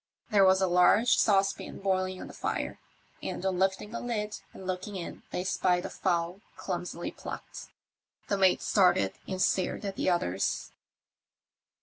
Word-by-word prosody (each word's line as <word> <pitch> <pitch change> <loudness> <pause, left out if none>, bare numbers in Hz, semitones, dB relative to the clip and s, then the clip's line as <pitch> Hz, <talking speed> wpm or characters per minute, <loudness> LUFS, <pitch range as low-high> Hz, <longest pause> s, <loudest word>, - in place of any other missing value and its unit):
There 200 -2 +6
was 190 0 +5
a - - +4
large 180 +7 +5
saucepan 195 -1 +2
boiling 185 -1 -1
on - - -6
the - - -10
fire, - - -3 0.4
and 190 - -4
on 185 -2 0
lifting 190 +2 0
the 235 - -4
lid 215 -3 -3
and 190 - -11
looking 185 +2 -4
in 175 -3 -6
they 180 - -2
spied 180 -1 +1
a - - -5
fowl 175 0 -1 0.2
clumsily 175 -2 -4
plucked. - - -8 0.6
The 200 - +1
mate 190 -2 +3
started 180 - +3
and 185 - -3
stared 185 +2 +1
at 195 -1 -4
the - - +1
others. 95 - 0
190 Hz, 155 wpm, -29 LUFS, 180-195 Hz, 0.6 s, There